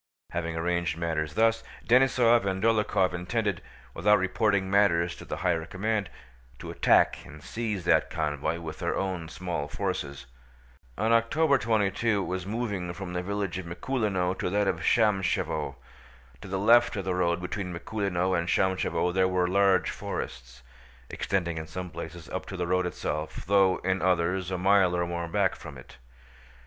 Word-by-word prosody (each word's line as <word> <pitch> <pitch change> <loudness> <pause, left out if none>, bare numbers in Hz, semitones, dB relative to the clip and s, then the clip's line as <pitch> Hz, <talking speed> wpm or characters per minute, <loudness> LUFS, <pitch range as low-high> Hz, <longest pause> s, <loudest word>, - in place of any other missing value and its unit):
Having 85 -1 -3
arranged 85 -1 -1
matters 80 -2 -2
thus, 115 0 +3 0.2
Denísov 120 -2 +4
and 95 0 -2
Dólokhov 105 -5 +2
intended, 100 +1 -2 0.3
without 105 +5 +4
reporting 95 +1 +1
matters 90 -4 +2
to - - -11
the - - -5
higher 85 -2 +2
command, 105 0 -2 0.5
to - - -7
attack - - +3
and 75 0 -13
seize 105 -6 -4
that - - +3
convoy 75 +1 -2
with 80 -2 -7
their - - -1
own 90 -4 -3
small 85 -4 -4
forces. 75 -6 -4 0.7
On 110 +3 +1
October 135 +6 +3
22 110 -1 +1
it - - -4
was 95 0 -4
moving 105 -5 -3
from 90 -1 -7
the 90 - -1
village 100 -1 -3
of 90 - -7
Mikúlino 95 -1 -1
to - - -1
that 100 +1 +1
of 95 -3 +1
Shámshevo. 95 - +1 0.7
To - - -9
the 95 - -2
left 120 +5 +5
of 100 -2 -4
the 95 - 0
road 85 -1 +1
between 90 +1 -4
Mikúlino 95 0 -1
and 85 -1 -1
Shámshevo 95 -1 +1
there 95 0 +3
were 90 -1 +1
large 95 -1 +3
forests, 60 0 -6 0.5
extending 85 -4 -1
in 80 - -7
some 90 +2 -6
places 80 0 -8
up 95 - -5
to 95 - -6
the 90 - -1
road 90 +1 +1
itself 75 -3 -4
though 95 -1 +4
in 95 +1 0
others 90 0 +1
a 95 - -2
mile 95 -1 +4
or 85 - 0
more 85 0 -3
back 80 - +1
from - - -10
it. - - -14
95 Hz, 165 wpm, -27 LUFS, 85-100 Hz, 0.7 s, left